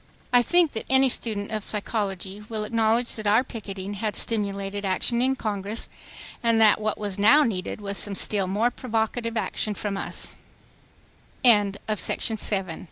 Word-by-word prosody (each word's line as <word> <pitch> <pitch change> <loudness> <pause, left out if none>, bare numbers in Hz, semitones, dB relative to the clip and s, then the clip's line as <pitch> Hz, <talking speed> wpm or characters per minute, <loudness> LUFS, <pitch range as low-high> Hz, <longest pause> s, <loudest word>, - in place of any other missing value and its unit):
I 245 - +7
think 345 +4 +3
that 220 - -6
any 265 0 +4
student 215 -4 -2
of 215 -1 -3
psychology 200 -2 -3
will 220 -2 -3
acknowledge 225 +2 +1
that 215 -1 -4
our 215 +4 +4
picketing 200 -5 -7
had 210 +1 -3
stimulated 200 -2 -1
action 200 +5 0
in 265 +1 +2
Congress, 210 -1 -4 0.5
and 230 -1 +2
that 215 -1 +5
what 215 0 -1
was 205 -2 -4
now 285 +9 +6
needed 195 -7 -3
was 200 -1 0
some 205 -1 +1
still 195 -1 +2
more 215 +6 +1
provocative 230 -1 -2
action 210 -1 -2
215 Hz, 135 wpm, -25 LUFS, 200-230 Hz, 0.5 s, I